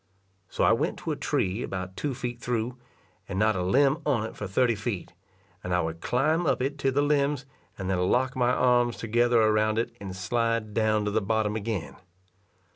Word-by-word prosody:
So - - -1
I - - +5
went - - 0
to - - -4
a - - -1
tree 95 +5 -1
about 95 -3 -5
two 145 -3 -3
feet 120 -1 -5
through, 120 0 -2 0.5
and 95 - -3
not 110 +1 +3
a 90 - -1
limb 135 - +3
on 130 -8 +1
it - - -8
for 105 - -5
thirty 115 +5 +2
feet, 100 -4 -4 0.5
and 90 -1 -1
I 90 - +2
would 80 0 -4
climb 155 +7 +1
up - - +2
it 140 +3 -2
to 135 0 +1
the 145 +2 +2
limbs, 145 -2 +1 0.3
and 95 - -4
then 95 -1 0
lock 130 +2 +1
my 125 -1 +2
arms 120 -2 +2
together 120 +1 +2
around 110 0 +3
it, 115 - -1
and 95 -2 -6
slide 115 +3 -1
down 110 -1 +2
to 105 - 0
the 110 - +1
bottom 105 +1 0
again. 110 -4 -4
115 Hz, 200 wpm, -27 LUFS, 105-125 Hz, 0.5 s, I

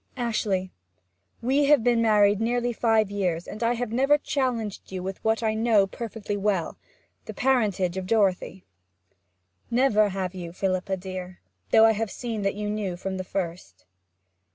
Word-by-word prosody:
'Ashley, 205 -6 -1 0.7
we 275 +4 +2
have 285 -4 +5
been 240 -1 +3
married 210 -2 +4
nearly 240 +1 0
five 220 -3 +2
years, 180 -4 -2
and 215 - -8
I 235 +1 +2
have 240 -2 -3
never 270 +5 +3
challenged 245 -10 -3
you 185 -1 -5
with 190 0 -6
what 220 +1 +1
I 220 -1 +1
know 220 -2 +3
perfectly 215 0 -5
well 195 -4 -1 0.5
the - - -8
parentage 205 -9 +1
of 185 -1 -4
Dorothy.' 195 -3 0 1.0
'Never 235 -4 +3
have 190 -1 -3
you, 175 -2 -7
Philippa 190 +1 -1
dear. 185 -1 -7 0.3
Though 220 0 +6
I 225 - +6
have 220 0 -2
seen 230 -2 -4
that 195 0 -1
you 210 0 -4
knew 205 -4 -3
from 190 +1 -4
the 185 - -3
first.' 175 - -5
210 Hz, 160 wpm, -25 LUFS, 190-230 Hz, 1.0 s, Though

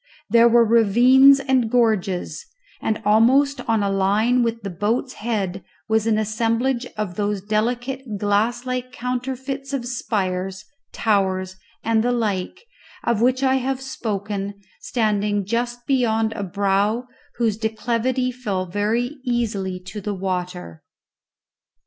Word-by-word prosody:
There 235 +1 +7
were 235 0 +5
ravines 245 +5 +6
and 260 -4 +1
gorges, 215 -6 0 0.4
and 215 - -1
almost 260 +7 +4
on 225 -2 +2
a 200 - +1
line 210 +6 +2
with 230 -1 -1
the 200 - -4
boat's 220 +8 -1
head 200 -5 -3 0.2
was 220 0 +1
an 220 -1 +3
assemblage 230 +4 0
of 205 -5 -3
those 205 -1 0
delicate 240 +3 -2
glass 215 +5 0
like 255 0 -3
counterfeits 260 +2 -4
of 260 -3 -2
spires, 195 -5 -2 0.3
towers, 190 -3 0 0.3
and 225 -1 +2
the 245 - +1
like, 210 -6 -2 0.4
of 235 -2 +1
which 255 +2 +2
I 265 0 +3
have 265 0 -2
spoken, 205 -6 -4 0.2
standing 210 -3 0
just 240 +3 -2
beyond 225 -4 +1
a - - -5
brow 200 +4 0 0.3
whose 225 -4 +1
declivity 235 +3 -1
fell 205 -7 -3
very 220 - -1
easily 210 -7 -1
to 205 +3 -8
the 205 +1 -3
water. 180 - -4
225 Hz, 130 wpm, -22 LUFS, 205-245 Hz, 0.4 s, There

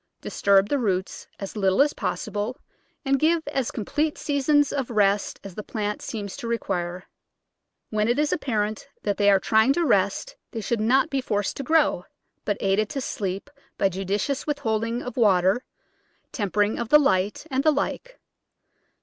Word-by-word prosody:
Disturb 200 0 +3
the 285 - +1
roots 190 -5 -2
as 195 +2 -6
little 195 -2 +1
as 290 +1 +4
possible, 215 +3 -3 0.5
and 270 0 +2
give 320 +2 +2
as 265 -3 -1
complete 295 +8 -2
seasons 290 0 +2
of 270 -4 -2
rest 205 -3 +1
as 195 - -8
the 210 - -5
plant 210 0 -3
seems 205 -3 -5
to 235 - -6
require. 180 -6 -2 0.9
When 215 0 +1
it 240 +2 +2
is 300 0 +1
apparent 215 -6 -2 0.2
that 205 -2 -1
they 205 -1 +4
are 195 -1 +5
trying 220 +7 +3
to 340 +3 +1
rest - - +1 0.2
they 225 - -3
should 225 +1 -1
not 255 +5 +3
be 275 -1 0
forced 205 -5 -1
to 275 - -3
grow, 305 - +2 0.4
but 205 -1 0
aided 200 +2 +1
to 275 - -3
sleep 195 -5 -3 0.3
by 195 - +3
judicious 195 - -2
withholding 230 -5 -1
of 250 +2 -7
water, 195 +1 +3 0.7
temper 205 -1 +1
ing 205 +2 -2
of 235 -2 -3
the 300 - +8
light, 205 -5 +1
and 265 +1 +1
the 310 - +5
like. - - -3
220 Hz, 170 wpm, -25 LUFS, 200-275 Hz, 0.9 s, the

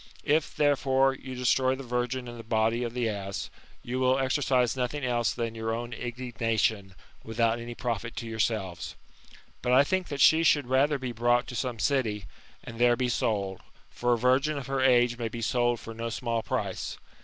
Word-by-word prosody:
If, 155 +1 +1
therefore, 135 -2 +3
you 130 -1 -8
destroy 130 +1 +2
the 135 - -8
virgin 125 +1 -2
in 120 - -7
the 115 - -9
body 115 +1 +1
of 120 0 -4
the 120 -2 0
ass, 100 -2 -4 0.3
you 125 +2 -3
will 130 0 +3
exercise 130 -2 +1
nothing 130 +2 -2
else 120 -2 +1
than 115 -2 -3
your 115 0 -3
own 120 +1 -5
indignation, 115 -5 -2 0.3
without 115 +1 0
any 120 0 -7
profit 115 -2 -3
to 115 - -5
yourselves. 110 -5 -2 0.7
But 125 0 +1
I 135 +2 +7
think 185 +5 -1
that 145 -1 -5
she 160 +4 +6
should 150 -4 +3
rather 135 +4 +2
be 130 -2 -4
brought 120 +2 +2
to 125 - -6
some 120 0 -2
city, 110 -7 0 0.4
and 115 0 -9
there 120 0 +5
be 125 0 -1
sold; 100 -5 -1 0.3
for 120 0 +1
a - - +2
virgin 130 +5 +2
of 140 - -5
her 135 0 -1
age 120 -2 +4
may 115 -1 -2
be 120 - -6
sold 120 0 +1
for 115 - -8
no 115 +1 -4
small 115 0 -2
price. - - -3
120 Hz, 190 wpm, -28 LUFS, 115-130 Hz, 0.7 s, I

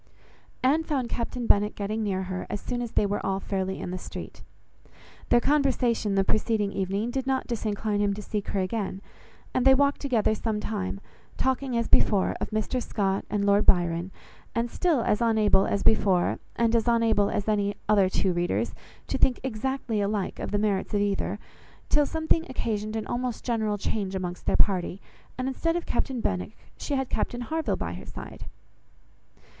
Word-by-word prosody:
Anne 285 +5 +4
found 270 -7 -1
Captain 240 +1 -3
Benwick 210 -1 +3
getting 210 +2 -2
near 190 -3 -1
her, 185 0 -4
as 205 - -3
soon 245 +3 -3
as 240 -2 -5
they - - +3
were 205 +1 -1
all 195 0 0
fairly 190 -1 -2
in - - -4
the 185 - -4
street. - - -8 0.9
Their 240 - +6
conversation 245 -7 +2
the 195 - +4
preceding 215 0 +1
evening 200 +4 -1
did 265 +1 -2
not 265 -1 +1
disincline 215 -2 -1
him 205 -1 +2
to 210 - -6
seek 210 -1 -3
her 200 - -1
again; 195 0 -3 0.5
and 255 - +2
they 265 0 +7
walked 280 +1 +2
together 235 -6 +2
some 215 0 -2
time, 200 -2 -3 0.4
talking 260 -1 0
as 230 - 0
before 200 -3 +3
of - - -2
Mr 215 +4 -1
Scott 195 -4 -1
and 205 -1 0
Lord 200 +1 +3
Byron, 175 0 +3 0.5
and 235 0 0
still 330 -8 +2
as 210 0 +1
unable 215 -4 +4
as 200 - 0
before, 195 -5 +3 0.2
and 235 0 +2
as 230 0 +2
unable 230 -3 +3
as 205 - -2
any 205 -1 +1
other 200 -3 +4
two 190 0 +1
readers, 175 0 0 0.3
to - - -2
think 255 - +3
exactly 255 -2 -2
alike 200 -1 -1
of - - -3
the 205 - 0
merits 205 -1 0
of 205 - +3
either, 200 -1 0 0.5
till 295 -1 +4
something 320 0 0
occasioned 215 -4 -2
an 220 - -2
almost 245 -1 -3
general 220 -4 0
change 195 -1 -2
amongst 180 -1 -4
their - - +3
party, 185 -1 +2 0.4
and 255 0 -2
instead 330 +5 0
of 345 - -2
Captain 250 0 -1
Benwick, 90 - -2 0.2
she 285 - -3
had 265 -1 0
Captain 245 0 -2
Harville 320 +6 -1
by - - -4
her - - -8
side. - - -9
215 Hz, 180 wpm, -27 LUFS, 200-245 Hz, 0.9 s, they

